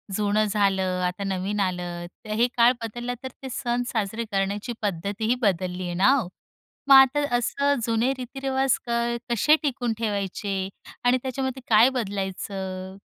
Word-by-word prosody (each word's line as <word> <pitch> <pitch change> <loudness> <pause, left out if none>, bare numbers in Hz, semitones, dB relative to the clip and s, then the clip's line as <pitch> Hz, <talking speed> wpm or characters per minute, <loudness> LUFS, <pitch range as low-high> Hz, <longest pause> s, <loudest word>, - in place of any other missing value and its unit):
जुनं 210 +1 +2
झालं, 190 -3 +1
आता 180 +3 -4
नवीन 195 +2 -2
आलं. 175 -2 -2 0.2
तर - - -10
हे 240 - +5
काळ 235 +1 +7
बदलला, 240 +2 -4
तर 260 - -4
ते 265 - -5
सण 240 +1 -1
साजरे 220 0 -2
करण्याची 200 +4 -1
पद्धतीही 205 +5 -1
बदलली 185 -2 0
आहे 175 - -3
ना 195 +9 +4
हो. 240 -10 -1 0.6
मग 275 - +10
आता 270 +2 +7 0.2
असं 280 +4 +1
जुने 230 +3 +1
रीतिरिवाज 265 +1 0
काय 235 0 0
कसे 260 +7 +4
टिकून 245 -5 -1
ठेवायचे? 200 -2 -2 0.4
आणि 250 +1 +5
त्याच्यामध्ये 265 0 -3
काय 225 +4 +7
बदलायचं, 190 -2 -4
215 Hz, 145 wpm, -25 LUFS, 195-245 Hz, 0.6 s, मग